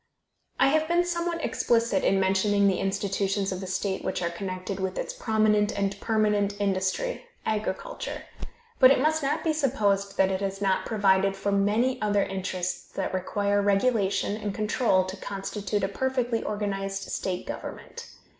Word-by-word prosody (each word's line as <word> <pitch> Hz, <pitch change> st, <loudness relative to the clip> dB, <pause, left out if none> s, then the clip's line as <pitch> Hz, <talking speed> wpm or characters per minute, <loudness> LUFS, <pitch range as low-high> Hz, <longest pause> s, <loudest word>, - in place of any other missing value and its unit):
I 270 Hz, -, +5 dB
have 315 Hz, +2 st, +2 dB
been 345 Hz, +1 st, +2 dB
somewhat 340 Hz, -1 st, -2 dB
explicit 230 Hz, -4 st, +1 dB
in 195 Hz, -, +3 dB
mentioning 195 Hz, +2 st, +2 dB
the 190 Hz, -2 st, +2 dB
institutions 195 Hz, 0 st, -1 dB
of 185 Hz, 0 st, -4 dB
the 190 Hz, -, -5 dB
state 190 Hz, +1 st, -2 dB
which -, -, -2 dB
are 170 Hz, -, -1 dB
connected 185 Hz, +2 st, -5 dB
with 190 Hz, -1 st, -2 dB
its -, -, -3 dB
prominent 215 Hz, -2 st, +2 dB
and 200 Hz, 0 st, -1 dB
permanent 210 Hz, -2 st, +1 dB
industry 200 Hz, -, -1 dB, 0.2 s
agriculture; 210 Hz, -3 st, -3 dB, 0.6 s
but 255 Hz, -, +9 dB
it 275 Hz, -, +4 dB
must 315 Hz, +3 st, +2 dB
not 295 Hz, +3 st, -1 dB
be 320 Hz, -, +1 dB
supposed 205 Hz, -9 st, 0 dB
that 190 Hz, 0 st, +3 dB
it 190 Hz, 0 st, -2 dB
has 195 Hz, 0 st, -2 dB
not 195 Hz, -2 st, +1 dB
provided 195 Hz, -2 st, +3 dB
for 200 Hz, +1 st, -1 dB
the 200 Hz, -, +2 dB
many 225 Hz, +6 st, +1 dB
other 205 Hz, -1 st, +2 dB
interests 185 Hz, -1 st, -4 dB
that 190 Hz, -, -3 dB
require 200 Hz, +2 st, 0 dB
regulation 200 Hz, 0 st, +1 dB
and 205 Hz, -2 st, -3 dB
control 210 Hz, -3 st, +2 dB
to 185 Hz, +1 st, -6 dB
constitute 200 Hz, +1 st, -3 dB
a -, -, +2 dB
perfectly 245 Hz, +1 st, -1 dB
organized 195 Hz, -2 st, -3 dB
state 180 Hz, -1 st, -3 dB
government. -, -, -7 dB
200 Hz, 165 wpm, -27 LUFS, 195-225 Hz, 0.6 s, but